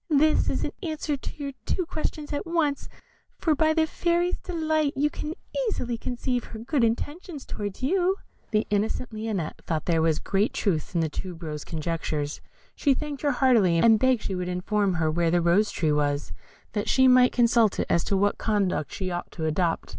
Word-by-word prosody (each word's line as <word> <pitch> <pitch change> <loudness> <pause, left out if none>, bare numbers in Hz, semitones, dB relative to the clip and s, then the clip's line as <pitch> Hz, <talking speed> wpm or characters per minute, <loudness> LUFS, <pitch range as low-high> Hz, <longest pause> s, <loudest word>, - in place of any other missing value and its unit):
This 305 +1 +3
is - - -1
an - - -2
answer 310 -4 -2
to 270 - -7
your 280 - -3 0.2
two 365 - 0
questions 305 -2 -4
at 290 - -3
once, 320 -4 0 0.5
for 320 - +2
by 315 +2 +3
the 320 -1 +3
Fairy's 345 +2 0
delight 315 -4 0
you 295 +2 +1
can 305 +2 -5 0.3
easily 245 - -2
conceive 245 +1 -2
her 225 - -9
good 245 +4 0
intentions 290 +7 -2
towards 205 +3 -5
you." 365 +6 +2 0.3
The 215 -1 +1
innocent 220 +3 -1
Lionette 215 -7 -3
thought 160 -2 -2
there 165 -2 +2
was 160 -1 +2
great 200 +2 0
truth 180 -2 -1
in 170 - +3
the 160 - +1
tube 175 +2 -7
rose's 150 -2 -5
conjectures; 155 -2 -3 0.3
she 280 -3 +2
thanked 295 0 -5
her 290 - +2
heartily, 240 -10 +4
and 220 +5 +5
begged 255 -3 +2
she 195 - -3
would 180 -1 -3
inform 190 +2 0
her 160 -1 +1
where 170 +1 +1
the 175 +1 +3
Rose 175 +5 +3
tree 155 -3 0
was, 145 -1 0 0.4
that 205 -2 -2
she 260 0 +5
might 250 0 +6
consult 235 -3 +3
it - - +1
as 170 - +2
to 195 - +1
what 205 +1 +1
conduct 200 -8 0
she 185 -2 -3
ought 175 0 -4
to 160 - -3
adopt. 165 +2 0
225 Hz, 195 wpm, -26 LUFS, 175-290 Hz, 0.5 s, might